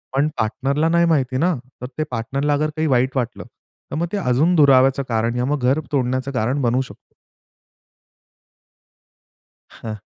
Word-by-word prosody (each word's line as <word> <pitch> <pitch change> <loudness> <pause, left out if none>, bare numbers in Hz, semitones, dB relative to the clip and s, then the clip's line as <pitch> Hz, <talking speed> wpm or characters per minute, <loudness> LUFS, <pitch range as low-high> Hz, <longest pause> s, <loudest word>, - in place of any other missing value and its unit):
पण 140 +2 +2
पार्टनरला 140 +7 0
नाही 170 0 +3
माहिती 135 -6 +1
ना, 175 +5 +2 0.3
तर 125 - -4
ते 155 - 0
पार्टनरला 135 +5 -1
अगर 150 +2 0
काही 160 0 0
वाईट 130 0 +1
वाटलं, 120 -2 -3 0.5
तर - - -3
मग 170 +2 -1
ते 210 - -2
अजून 160 +1 +2
दुराव्याचं 135 -3 +4
कारण, 115 +1 0
या 125 - 0
मग 145 +2 -1
घर 130 +4 +2
तोडण्याचं 130 -1 -1
कारण 130 +3 -1
बनू 125 +1 +1
शकत. 130 - -12 2.6
हां. 110 -1 -7
135 Hz, 155 wpm, -20 LUFS, 125-150 Hz, 2.6 s, दुराव्याचं